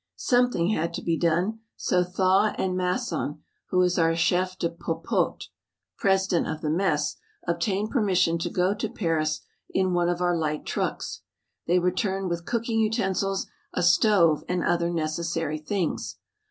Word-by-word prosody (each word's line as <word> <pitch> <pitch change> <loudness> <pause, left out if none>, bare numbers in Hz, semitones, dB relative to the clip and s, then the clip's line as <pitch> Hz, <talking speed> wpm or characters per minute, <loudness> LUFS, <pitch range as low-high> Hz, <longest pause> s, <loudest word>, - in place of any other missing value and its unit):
Something 245 - +2
had 170 -5 -1
to - - -5
be 165 - +1
done, 175 +7 +1 0.2
so 180 0 +1
Thaw 190 +3 +2
and 185 -1 0
Masson, 180 - -2 0.3
who 185 - +2
is 180 0 +1
our 165 0 +3
Chef 180 +2 +1
de 170 - 0
Popote 170 +1 -2 0.5
(President 190 -2 +2
of 155 0 -4
the 150 - -1
Mess) 155 -4 0 0.3
obtained 190 +5 0
permission 185 -8 +2
to - - -2
go 180 +2 +1
to 210 - -3
Paris 155 -4 -1 0.3
in 185 -1 +1
one 175 0 +2
of 175 0 -1
our 175 -1 +2
light 155 -2 -2
trucks. - - -3 0.5
They 175 +2 +4
returned 185 +1 0
with 170 0 -4
cooking 230 -1 0
utensils, 195 -3 0 0.3
a 180 - +1
stove, 170 -3 +4
and 180 -1 0
other 170 0 +1
necessary 165 -1 -2
things. 175 +2 -2
180 Hz, 155 wpm, -26 LUFS, 170-195 Hz, 0.5 s, They